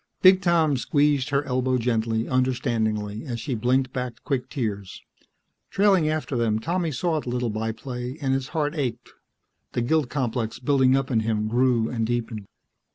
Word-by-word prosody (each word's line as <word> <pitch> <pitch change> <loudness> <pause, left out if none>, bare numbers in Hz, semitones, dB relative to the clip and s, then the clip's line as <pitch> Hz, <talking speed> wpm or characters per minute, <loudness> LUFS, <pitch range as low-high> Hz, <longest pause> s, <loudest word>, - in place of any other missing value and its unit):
Big 185 0 +7
Tom 165 -6 +3
squeezed 145 +1 +1
her 140 0 +1
elbow 130 -1 0
gently, 115 -1 0
understandingly, 115 -5 0
as 120 -2 -4
she 130 +3 -3
blinked 130 +3 +1
back 125 -1 -3
quick 130 -2 -2
tears. 105 -8 -4 0.7
Trailing 195 -6 +3
after 155 -3 -2
them, 115 -3 +1
Tommy 170 +7 -1
saw 155 +4 -1
the 125 - -6
little 120 -2 -1
by 110 +1 -2
play 125 +3 -6
and 135 -3 0
his 135 0 -1
heart 150 0 -1
ached. 135 -7 -3 0.6
The 120 - 0
guilt 150 +1 +1
complex 120 -5 -2
building 130 0 +3
up 135 0 -2
in 115 - +3
him 110 -1 0
grew 120 0 +2
and 115 -2 -2
deepened. 115 -4 -3
125 Hz, 165 wpm, -25 LUFS, 115-145 Hz, 0.7 s, Big